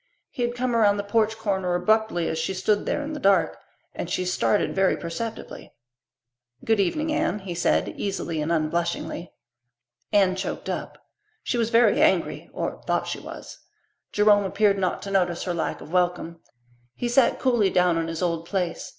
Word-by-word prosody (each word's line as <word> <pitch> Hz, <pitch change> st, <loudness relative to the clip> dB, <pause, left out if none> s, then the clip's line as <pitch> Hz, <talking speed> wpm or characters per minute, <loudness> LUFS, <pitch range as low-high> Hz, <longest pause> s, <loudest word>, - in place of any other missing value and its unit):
He -, -, -6 dB
had 240 Hz, 0 st, 0 dB
come 245 Hz, -1 st, -1 dB
around 205 Hz, -3 st, +4 dB
the 205 Hz, -, -2 dB
porch 220 Hz, +1 st, +1 dB
corner 190 Hz, -5 st, -1 dB
abruptly 180 Hz, -2 st, +1 dB
as 160 Hz, -, -2 dB
she 165 Hz, +4 st, -2 dB
stood 205 Hz, +3 st, 0 dB
there 295 Hz, -, -1 dB
in 300 Hz, +2 st, -5 dB
the 300 Hz, -, -5 dB
dusk, 190 Hz, -, +3 dB, 0.4 s
and -, -, -5 dB
she 185 Hz, -, -1 dB
started 190 Hz, +3 st, +1 dB
very 190 Hz, -1 st, +2 dB
perceptibly. 215 Hz, +7 st, -6 dB, 0.9 s
"Good 225 Hz, -2 st, +2 dB
evening, 305 Hz, -, 0 dB
Anne," 315 Hz, -7 st, 0 dB
he 190 Hz, -3 st, -6 dB
said, 170 Hz, -, +1 dB
easily 170 Hz, -5 st, -3 dB
and 155 Hz, +2 st, -2 dB
unblushingly. 170 Hz, +2 st, -2 dB, 0.8 s
Anne 195 Hz, -3 st, +4 dB
choked 190 Hz, -, -4 dB
up. -, -, -4 dB, 0.5 s
She -, -, -1 dB
was 230 Hz, -1 st, +1 dB
very 235 Hz, +1 st, +4 dB
angry, -, -, +1 dB
or -, -, -4 dB
thought -, -, +1 dB
she -, -, -4 dB
was. -, -, -10 dB, 0.5 s
Jerome 210 Hz, -1 st, +4 dB
appeared 200 Hz, +1 st, +2 dB
not 185 Hz, -1 st, -1 dB
to 200 Hz, -, -6 dB
notice 180 Hz, -3 st, +1 dB
her 180 Hz, -, -2 dB
lack 170 Hz, -, -3 dB
of 155 Hz, -, -11 dB
welcome. 175 Hz, -2 st, 0 dB, 0.6 s
He 245 Hz, -, -2 dB
sat 245 Hz, +1 st, +3 dB
coolly 240 Hz, -7 st, +2 dB
down 180 Hz, -2 st, +2 dB
in 165 Hz, -, -2 dB
his 165 Hz, +2 st, -4 dB
old 170 Hz, -1 st, -1 dB
place. 180 Hz, -4 st, -2 dB
195 Hz, 175 wpm, -25 LUFS, 175-220 Hz, 0.9 s, around